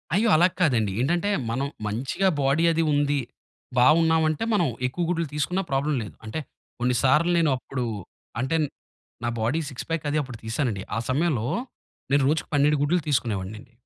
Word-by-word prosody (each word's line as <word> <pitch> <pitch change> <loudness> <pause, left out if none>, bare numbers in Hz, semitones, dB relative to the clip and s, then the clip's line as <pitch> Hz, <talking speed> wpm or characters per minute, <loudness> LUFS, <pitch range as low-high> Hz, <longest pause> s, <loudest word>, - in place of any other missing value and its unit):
అయ్యో! 220 +3 +3
అలా 170 +3 +6
కాదండి. 120 - +2
ఏంటంటే, 175 +8 +1 0.2
మనం 135 +4 -1 0.2
మంచిగా 135 - 0
బాడీ 140 +4 +2
అది 165 0 +1
ఉంది. 145 0 +2 0.6
బాగున్నామంటే 160 - +4
మనం 180 -6 +3 0.2
ఎక్కువ 175 +7 -3
గుడ్లు 170 -2 0
తీసుకున్నా 180 +6 0
ప్రాబ్లమ్ 140 +2 +1
లేదు. 105 - -10
అంటే 110 +8 -4 0.4
కొన్ని 125 +1 +1
సార్లు 150 +6 +4
నేనప్పుడు 135 -5 0 0.5
అంటే 130 +6 0 0.7
నా 120 - 0
బాడీ 120 +9 +1
సిక్స్ 135 - -7
పాక్ 165 -1 -2
అది 150 - 0
అప్పుడు 130 -4 -7
తీసానండి. 115 -4 -1
ఆ - - +1
సమయంలో 135 -4 +1 0.6
నేను 140 0 +4
రోజుకి 155 +1 -1
12 145 +1 +4
గుడ్లు 170 +4 +2
తీసుకునేవాన్నండి. 110 -4 -2
145 Hz, 150 wpm, -25 LUFS, 125-165 Hz, 0.7 s, అలా